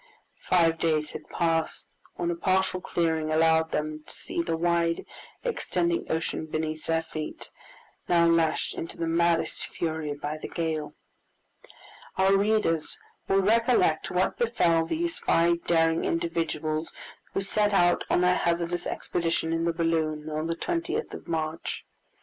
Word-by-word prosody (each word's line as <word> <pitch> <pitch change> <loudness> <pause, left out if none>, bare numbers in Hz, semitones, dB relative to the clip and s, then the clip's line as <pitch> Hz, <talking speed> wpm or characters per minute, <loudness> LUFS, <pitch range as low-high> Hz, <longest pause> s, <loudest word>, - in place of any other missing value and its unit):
Five 165 -2 +4
days 155 -2 +1
had 155 - -9
passed 165 -2 0 0.3
when 175 0 -1
a - - -2
partial 185 +1 +1
clearing 160 -3 0
allowed 160 0 +3
them 155 0 -3
to - - -9
see - - -4
the 165 -1 -1
wide 170 0 +1 0.4
extending 175 - -1
ocean 160 0 -2
beneath 155 0 -3
their 165 0 +1
feet, 155 -1 -7 0.6
now 170 -1 +4
lashed 165 -1 +2
into 165 - -6
the 165 - -1
maddest 165 0 +1
fury 160 -3 -3
by 150 +1 -4
the - - -6
gale. 160 -2 -3 1.2
Our 190 +1 +4
readers 200 -6 +1 0.3
will 195 0 +3
recollect 225 -6 +3
what 180 +1 0
befell 170 -9 +2
these 335 - -1
five 170 0 +2
daring 165 -1 +3
individuals 165 -2 -1 0.4
who - - 0
set 210 +1 +1
out 175 -3 +3
on - - +3
their 180 0 +4
hazardous 170 0 -1
expedition 165 -1 -1
in 165 0 0
the 170 - +2
balloon 160 -2 -1
on 155 +1 -2
the 165 - -1
20th 350 - -2
of - - -9
March. 160 -1 -3
165 Hz, 145 wpm, -27 LUFS, 160-175 Hz, 1.2 s, Five